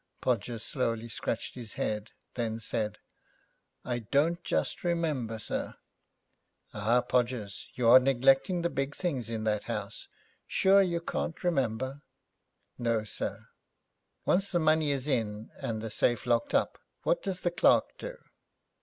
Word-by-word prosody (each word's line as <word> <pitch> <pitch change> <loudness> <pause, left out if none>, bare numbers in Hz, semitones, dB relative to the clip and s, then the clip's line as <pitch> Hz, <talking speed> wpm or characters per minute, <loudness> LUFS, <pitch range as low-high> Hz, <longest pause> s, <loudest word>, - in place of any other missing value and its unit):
Podgers 120 -2 -1
slowly 115 -4 -1
scratched 115 0 -3
his 120 -4 -7
head, 105 0 -2 0.2
then 115 -2 -2
said, 105 -1 -2 0.9
'I 120 -1 -1
don't 145 - +1
just - - -1
remember, 155 -10 0
sir.' 110 - -3 1.0
'Ah, 110 +4 +3
Podgers, 120 -5 -1
you 120 -2 +1
are 125 +3 +10
neglecting 135 +7 +3
the 170 - +1
big 135 +2 -2
things 135 - -2
in 110 -1 -3
that 105 -1 0
house. - - -4 0.4
Sure 195 +1 +5
you 170 -3 0
can't 170 0 -3
remember?' 135 -4 0 0.8
'No, 115 -2 +1
sir.' 105 - -5 0.8
'Once 195 +2 +2
the 175 - +2
money 155 -1 +3
is 140 -1 -1
in 110 -5 -1
and 110 -1 -3
the 110 - -4
safe 120 +2 +1
locked 120 -1 +1
up, - - +1 0.2
what - - +2
does 190 -2 -3
the 175 - +1
clerk 175 - +3
do?' - - -6
125 Hz, 140 wpm, -30 LUFS, 115-155 Hz, 1.0 s, are